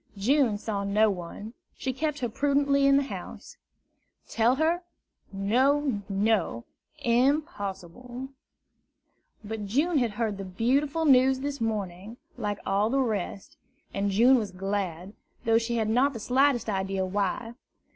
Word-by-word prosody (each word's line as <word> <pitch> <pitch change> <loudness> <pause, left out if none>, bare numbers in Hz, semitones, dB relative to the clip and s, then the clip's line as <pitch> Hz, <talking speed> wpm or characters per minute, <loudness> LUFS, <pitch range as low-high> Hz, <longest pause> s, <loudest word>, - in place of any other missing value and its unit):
June 240 +1 +2
saw 205 -1 -3
no 210 +2 +3
one; 190 +4 -7 0.2
she 260 - -2
kept 295 +1 -2
her 245 - 0
prudently 280 +2 +2
in 275 0 +5
the 280 - +2
house. 275 - -8 0.7
Tell 235 +3 +2
her? 325 +4 +1 0.5
No, 250 +5 +1
no, 200 - 0 0.4
impossible! 245 - -1 1.1
But 210 -1 -5
June 295 - +2
had 235 -4 0
heard 210 -2 -2
the - - -4
beautiful 275 - 0
news 265 -1 +5
this 285 -2 -4
morning, 210 -1 -3 0.2
like 205 -1 -3
all 200 +2 +1
the 270 +3 +1
rest; 210 -6 -3 0.4
and 200 0 0
June 240 +7 +5
was 210 -3 -3
glad, 190 -1 -4 0.3
though 225 0 +4
she 235 +1 -2
had 220 -2 0
not 255 +6 +2
the 230 - -6
slightest 255 +2 +2
idea 190 -2 -1
why. 205 +4 -2
225 Hz, 135 wpm, -27 LUFS, 200-270 Hz, 1.1 s, in